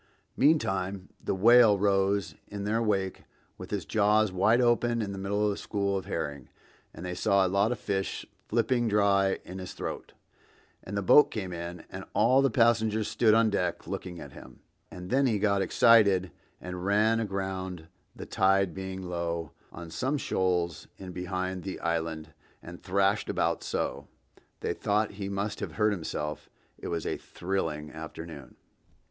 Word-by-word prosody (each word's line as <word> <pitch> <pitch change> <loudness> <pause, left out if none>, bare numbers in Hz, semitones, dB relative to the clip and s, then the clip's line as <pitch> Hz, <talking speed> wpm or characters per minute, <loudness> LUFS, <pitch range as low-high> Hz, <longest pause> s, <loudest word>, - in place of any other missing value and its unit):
Meantime 95 - +1
the - - -1
whale 115 +1 +6
rose 95 -3 +1
in 100 -1 -6
their 110 +3 0
wake 95 -4 -1 0.4
with - - -8
his - - -3
jaws 105 -1 +3
wide 105 +6 +3
open 120 -1 +2
in 105 -3 -2
the 100 - -6
middle 100 +2 0
of 105 - +2
a - - -7
school 100 -1 -1
of 95 - -3
herring, 70 -3 -4 0.4
and 90 - -9
they 90 - -3
saw 100 +1 +2
a - - +2
lot 100 +4 +2
of 125 - -1
the - - -23
fish 95 -1 -2 0.2
flipping 120 +1 +1
dry 100 -2 +3
in 95 +1 -8
his 90 - -7
throat; - - -6 0.7
and 100 +2 -5
the 100 - -1
boat 145 +9 +7
came 95 -8 -5
in 85 0 -6
and - - -6
all 125 +5 +5
the 135 - +3
passengers 110 -2 +2
stood 110 -2 +3
on 115 -1 +4
deck 90 -4 -1
looking 90 -2 -6
at 70 - -9
him, - - -14 0.3
and 90 0 -9
then 135 +1 +3
he 110 -4 +1
got 100 -1 +2
excited 95 -2 +4 0.3
and 90 0 -6
ran 105 +3 +3
aground, 95 -5 -4 0.3
the - - -8
tide 95 -2 +2
being 95 0 -6
low, 85 -2 -3 0.2
on 85 -1 -9
some 130 - -1
shoals 90 -8 -1
in 95 -1 -8
behind 90 +1 -3
the 95 +1 -6
Island, 80 -1 -3 0.3
and 85 0 -10
thrashed 100 +2 +1
about - - 0
so, - - -3 0.5
they - - -1
thought 105 +1 0
he 100 -1 -5
must 100 +1 -3
have - - -5
hurt 105 -1 +2
himself. 75 -5 -4 0.3
It - - -6
was 85 -2 -3
a - - -2
thrilling 80 -5 -4
afternoon. 80 -3 -9
95 Hz, 170 wpm, -28 LUFS, 90-105 Hz, 0.7 s, boat